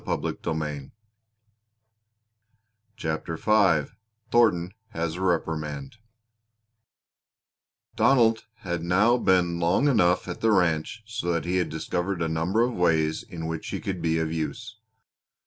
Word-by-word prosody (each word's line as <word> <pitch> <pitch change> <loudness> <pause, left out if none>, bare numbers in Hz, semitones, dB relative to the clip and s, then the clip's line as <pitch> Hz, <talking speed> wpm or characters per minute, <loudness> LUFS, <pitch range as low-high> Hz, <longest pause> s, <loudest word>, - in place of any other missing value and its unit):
CHAPTER 80 - -3 2.8
V 95 -9 +3 0.4
THORNTON 95 -7 +3 0.2
HAS 85 -6 -3
A - - -6
REPRIMAND 75 -5 -2 2.0
Donald 115 -4 +3 0.2
had 85 -4 -3
now 100 +8 +3
been 90 -5 +2
long 85 +11 +2
enough 90 -11 +3
at 90 - -6
the 115 - +3
ranch 90 +3 +1
so 110 -6 -3
that 85 -1 -1
he 90 +1 0
had 90 - 0
discovered 85 +3 -2
a - - 0
number 85 +8 +1
of 125 +1 0
ways 80 -4 +1
in 80 -2 -8
which 80 -1 -4
he - - -3
could 95 -2 -4
be 80 -1 +1
of 80 -1 -1
use. 80 +7 -5
85 Hz, 120 wpm, -26 LUFS, 80-100 Hz, 2.8 s, V